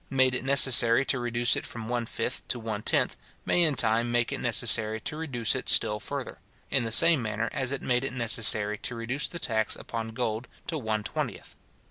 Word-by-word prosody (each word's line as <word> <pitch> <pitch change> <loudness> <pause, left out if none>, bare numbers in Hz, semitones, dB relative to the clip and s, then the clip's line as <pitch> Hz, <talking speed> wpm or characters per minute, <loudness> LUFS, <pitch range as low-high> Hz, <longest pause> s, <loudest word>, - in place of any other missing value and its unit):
made 130 -1 +2
it 125 - -3
necessary 130 -2 +5
to 130 - -1
reduce 120 0 +1
it - - -4
from 115 -2 -8
one 120 -1 -3
fifth - - -5
to - - -3
one 110 -2 -6
tenth, - - 0 0.3
may 175 - +1
in 155 -4 +3
time 115 0 0
make 120 0 -1
it - - -4
necessary 110 -2 +4
to 150 - -7
reduce 135 -8 -2
it - - -3
still 105 0 +4
further; 100 - -7 0.3
in - - +1
the 115 - -4
same 165 +3 +5
manner 110 0 -4
as 135 -3 -2
it 140 - -5
made 125 0 -1
it 135 - -4
necessary 110 -4 +2
to 125 - -6
reduce 120 +5 -3
the 170 - -6
tax 110 -8 -1
upon 115 -1 -7
gold 115 0 -4 0.2
to 165 - -4
one 110 -6 -3
twentieth. - - -6
120 Hz, 205 wpm, -26 LUFS, 110-130 Hz, 0.3 s, necessary